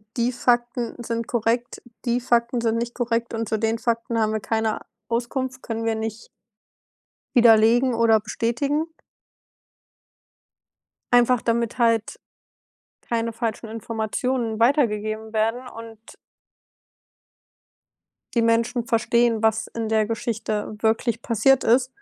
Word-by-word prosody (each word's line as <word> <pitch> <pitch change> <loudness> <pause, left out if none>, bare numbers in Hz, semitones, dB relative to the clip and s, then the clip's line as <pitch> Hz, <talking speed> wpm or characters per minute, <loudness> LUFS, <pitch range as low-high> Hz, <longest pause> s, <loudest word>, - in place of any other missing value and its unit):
die 240 0 +1
Fakten 240 -1 0
sind 230 0 -3
korrekt, 235 +1 -1 0.2
die 240 0 +1
Fakten 235 0 +1
sind 230 -1 +1
nicht 235 +1 -3
korrekt 235 -1 -1
und 225 0 -2
zu 220 - -1
den 225 0 0
Fakten 230 -1 -1
haben 215 0 +1
wir 220 - 0
keine 220 +1 -1 0.3
Auskunft, 255 +2 -2
können 225 -1 -4
wir 225 -1 +1
nicht 220 0 -5 1.1
widerlegen 235 +2 +5
oder 230 -1 +4
bestätigen. 235 +8 -1 2.3
Einfach 245 0 +5
damit 235 0 -1
halt 230 -2 +1 0.8
keine 230 -1 -2
falschen 230 -1 -4
Informationen 225 +1 -2
weitergegeben 220 -4 +1
werden 225 +4 0
und 225 -2 -10 2.4
die 235 - +3
Menschen 230 +1 +1
verstehen, 235 -1 +2
was 220 0 +2
in 225 -1 -4
der 220 -1 +2
Geschichte 220 -1 -3
wirklich 225 +1 0
passiert 265 +3 +3
ist. 250 +3 +4
230 Hz, 115 wpm, -23 LUFS, 225-240 Hz, 2.4 s, widerlegen